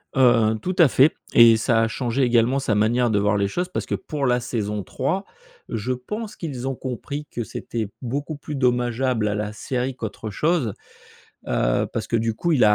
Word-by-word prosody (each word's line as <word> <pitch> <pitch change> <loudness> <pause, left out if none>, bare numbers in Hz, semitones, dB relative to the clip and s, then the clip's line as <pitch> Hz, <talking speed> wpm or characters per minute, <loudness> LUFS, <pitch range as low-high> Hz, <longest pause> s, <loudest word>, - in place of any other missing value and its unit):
Heu, 115 -4 +4
tout 185 0 -2
à 165 - +8
fait 135 +4 +4 0.2
et 115 -1 +8
ça 115 0 +2
a 115 - +2
changé 125 +3 -1
également 120 +1 +3
sa 135 -5 0
manière 115 +3 +2
de 105 - +2
voir 105 0 +2
les 100 - +1
choses 180 - -2
parce - - -3
que - - -4
pour 145 -3 -3
la 125 -1 +3
saison 105 -4 -3
3 160 - -2 0.5
je 115 +3 -2
pense 210 - -6
qu'ils 135 -6 -5
ont 135 - -1
compris 135 +3 -5
que 120 - -4
c'était 110 -1 -5
beaucoup 140 +5 -3
plus 145 0 -7
dommageable 125 -2 +1
à 105 - 0
la 105 0 -3
série 125 +3 -3
qu'autre 110 -2 -6
chose. 150 - +1 0.7
Heu, - - +1
parce - - -3
que 115 - 0
du 115 0 0
coup, 170 +8 0
il 130 -7 +4
a 105 0 +6
125 Hz, 205 wpm, -23 LUFS, 110-135 Hz, 0.7 s, à